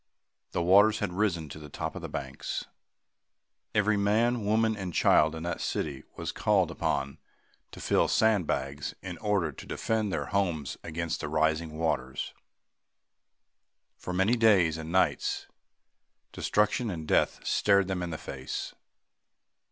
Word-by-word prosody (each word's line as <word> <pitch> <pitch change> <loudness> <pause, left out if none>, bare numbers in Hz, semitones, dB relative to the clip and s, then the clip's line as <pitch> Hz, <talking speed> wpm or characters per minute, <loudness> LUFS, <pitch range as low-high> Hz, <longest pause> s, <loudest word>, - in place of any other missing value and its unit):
The 85 - -1
waters 100 +5 +6
had 90 - -2
risen 90 -5 0
to 75 - -8
the 75 -1 -10
top - - -4
of - - -6
the - - -6
banks. 65 0 -4 1.1
Every 105 0 +3
man, 110 +3 +2
woman 110 +2 +2
and 95 -4 -5
child 80 +1 +4
in 80 - -6
that 85 -1 -3
city 70 -4 -3
was - - -4
called - - +2
upon 70 +1 -2 0.5
to - - -11
fill - - +2
sand 110 -7 +3
bags 70 +2 -3
in 90 -2 -6
order 100 -7 +1
to - - -11
defend 110 -2 -1
their - - -1
homes 85 -8 -1
against 85 0 -3
the 75 - -4
rising 80 +1 0
waters. 65 -6 -2 1.6
For - - -6
many 95 +6 +3
days 100 -9 +4
and 80 0 -6
nights, 90 -5 +1 0.9
destruction 105 +3 +1
and 80 -5 -5
death - - +2
stared 100 -2 +3
them 95 -2 -2
in 90 - -3
the 80 - -4
face. 65 -3 -6
90 Hz, 145 wpm, -29 LUFS, 80-105 Hz, 1.6 s, waters